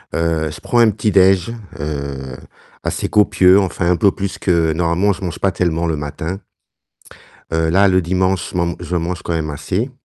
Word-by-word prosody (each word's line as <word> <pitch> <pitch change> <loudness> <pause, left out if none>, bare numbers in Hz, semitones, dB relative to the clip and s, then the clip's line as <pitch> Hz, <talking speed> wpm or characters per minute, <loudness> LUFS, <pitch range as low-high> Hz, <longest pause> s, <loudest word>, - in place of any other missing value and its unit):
Heu, 80 -1 0
je 75 - -9
prends 120 - +1
un 115 -1 +6
petit 105 +1 -1
déj'. 95 +1 +4 0.3
Heu, 70 -3 -5 0.5
assez - - -2
copieux 95 -2 +5
enfin 90 -2 -1
un - - +3
peu 100 0 +4
plus 100 0 -4
que 85 -3 +1
normalement 85 +4 +1
je - - -11
mange 85 -2 -4
pas 95 - +1
tellement 85 -2 -1
le 80 -2 -1
matin. 80 +5 -5 1.1
Heu, 80 0 +1
là 100 +4 +4
le 95 0 +3
dimanche, 95 0 0
je - - -5
man 85 -1 0
je 90 - -3
mange 85 +1 -3
quand - - -3
même 80 -2 -2
assez. 90 - -3
85 Hz, 190 wpm, -18 LUFS, 80-95 Hz, 1.1 s, un